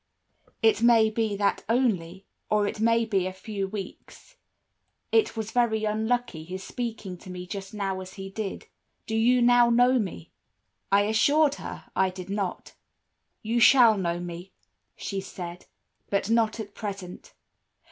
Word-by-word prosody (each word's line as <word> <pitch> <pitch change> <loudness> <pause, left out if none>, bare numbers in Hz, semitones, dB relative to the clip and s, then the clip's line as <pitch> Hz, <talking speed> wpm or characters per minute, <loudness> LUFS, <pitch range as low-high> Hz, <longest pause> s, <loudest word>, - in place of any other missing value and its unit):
"'It 220 -1 +4
may 230 -2 +5
be 220 -2 -1
that 200 0 0
only, 195 -7 0 0.2
or 210 -1 +2
it 205 - -4
may 230 +1 +3
be 195 -4 0
a - - -3
few 195 +1 -5
weeks. 205 - -9 0.8
It 445 - +2
was 220 0 -4
very 230 -3 +1
unlucky 220 -4 -1
his 185 +3 -7
speaking 220 -7 -5
to - - -12
me 180 0 -6
just 195 +1 -7
now 195 -3 -3
as 185 0 -10
he 195 -1 -7
did. 200 -1 -5 0.4
Do 220 - -3
you 240 +2 +4
now 240 0 +5
know 245 +2 +4
me?' 185 - -5 0.6
"I 200 +1 +5
assured 280 +8 +3
her - - -8
I 190 0 +3
did 185 +1 -8
not. 200 -3 -3 0.7
"'You 230 +2 0
shall 235 -2 +7
know 175 -3 -1
me,' 175 +1 -8 0.4
she 195 -1 -4
said, 180 -2 -8 0.4
'but 200 +1 0
not 230 -1 +2
at 205 -2 -7
present. 200 - -7
210 Hz, 155 wpm, -26 LUFS, 190-230 Hz, 0.8 s, shall